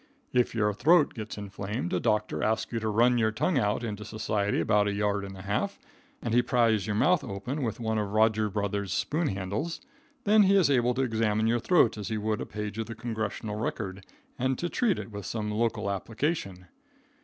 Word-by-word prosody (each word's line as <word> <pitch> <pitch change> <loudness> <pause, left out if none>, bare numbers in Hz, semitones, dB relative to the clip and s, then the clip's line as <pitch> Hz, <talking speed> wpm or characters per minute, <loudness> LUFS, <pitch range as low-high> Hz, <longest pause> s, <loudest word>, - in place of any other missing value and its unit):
If 125 -1 +2
your 105 -2 +2
throat 150 - +4
gets 110 -2 -6
inflamed, 100 -2 -4
a 90 - +2
doctor 105 -9 0
asks 110 +5 0
you 115 - 0
to 110 0 -2
run 120 +3 +4
your 110 -1 +3
tongue 150 +6 +1
out 105 +1 0
into 105 -2 -4
society 105 -1 -1
about 105 -1 +3
a 100 - 0
yard 100 0 0
and 95 -1 -8
a 95 - -9
half, 105 - -1 0.5
and 115 - -1
he 120 - +5
pries 115 -4 +2
your 105 - -1
mouth 180 +10 +3
open 125 +7 -4
with 115 -3 -2
one 110 -1 0
of 105 -1 -2
Rogers 110 0 +2
Brothers' 100 -1 -2
spoon 155 - 0
handles. 100 - -3 0.4
Then 210 +1 +5
he 200 0 +5
is 180 -7 +4
able 125 -2 +2
to 135 - +1
examine 110 -3 +1
your 115 +1 +2
throat 120 -7 +3
as 105 - -5
he 110 -1 -2
would 105 0 -1
a - - -5
page 105 +1 -5
of 110 - -2
the 115 - -6
Congressional 110 -2 -4
Record, 95 -3 -4 0.4
and 130 +1 +1
to 175 - -2
treat 225 -2 +1
it - - -7
with 100 -1 -6
some 105 -2 -3
local 110 -1 0
application. 100 - -3
110 Hz, 210 wpm, -28 LUFS, 105-120 Hz, 0.5 s, he